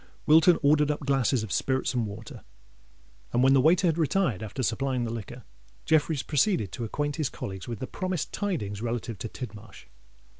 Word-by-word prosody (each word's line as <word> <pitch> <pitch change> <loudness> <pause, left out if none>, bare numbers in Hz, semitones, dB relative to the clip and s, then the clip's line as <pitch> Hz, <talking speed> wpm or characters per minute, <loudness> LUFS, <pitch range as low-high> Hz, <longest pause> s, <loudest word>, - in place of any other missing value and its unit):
Wilton 160 +3 +6
ordered 150 +1 +4
up 150 - -1
glasses 135 -4 +1
of 110 - -6
spirits 130 0 0
and 120 -3 0
water; 105 +1 -9 0.9
and 120 +1 +2
when 135 +1 +6
the 135 - +5
waiter 170 +7 +4
had 165 0 +1
retired, 160 - +1
after 110 +5 -4
supplying 125 +2 0
the 115 -1 -3
liquor, 115 +2 -7 0.4
Jeffreys 155 -2 +2
proceeded 145 - +1
to 120 - -5
acquaint 145 +6 -2
his 155 -5 0
colleagues 95 -2 -7
with 120 -2 -4
the 130 - -4
promised 185 +2 -3
tidings 110 - -3
relative 115 -3 -3
to 115 - -4
Tidmarsh. 110 -3 -9
130 Hz, 180 wpm, -27 LUFS, 115-155 Hz, 0.9 s, Wilton